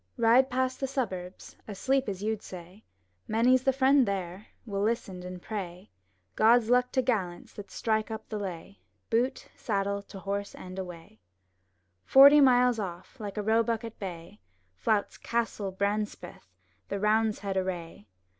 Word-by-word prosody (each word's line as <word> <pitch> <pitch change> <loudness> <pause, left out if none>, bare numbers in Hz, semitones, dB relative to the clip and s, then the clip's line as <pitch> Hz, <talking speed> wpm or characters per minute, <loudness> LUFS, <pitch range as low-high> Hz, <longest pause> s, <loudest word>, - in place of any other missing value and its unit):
Ride 240 +3 +5
past 260 +1 -1
the 270 - -1
suburbs, 190 -9 -5
asleep 260 +5 0
as 195 0 -5
you'd 215 -1 -1
say; 180 +3 -11 0.4
Many's 245 +4 +3
the 265 - +3
friend 265 -1 +4
there, 190 0 -4 0.2
will 200 -3 -3
listen 205 -4 -2
and 180 0 -7
pray 180 - -7 0.4
'God's 230 +1 +4
luck 250 0 +3
to 260 - +2
gallants 195 -8 -2
that 200 -2 -10
strike 220 +2 -1
up 220 0 -6
the 215 - -4
lay 195 0 -7 0.2
— - - -47
Boot, 240 +4 0
saddle, 200 -2 -1
to 200 - -12
horse, 200 +1 -4
and 185 0 -9
awayP^ 170 - -9 0.8
Forty 280 +2 +8
miles 250 -3 +4
off, 185 +5 -7
like 205 -1 -6
a 210 - -1
roebuck 225 +1 +1
at 230 -1 -8
bay, 170 - -8 0.3
Flouts 205 - -1
Castle 230 -4 -2
Brancepeth 205 +2 -3 0.4
the 200 - -2
Roundheads 210 -1 +1
array! 175 - -4
210 Hz, 150 wpm, -28 LUFS, 190-235 Hz, 0.8 s, Forty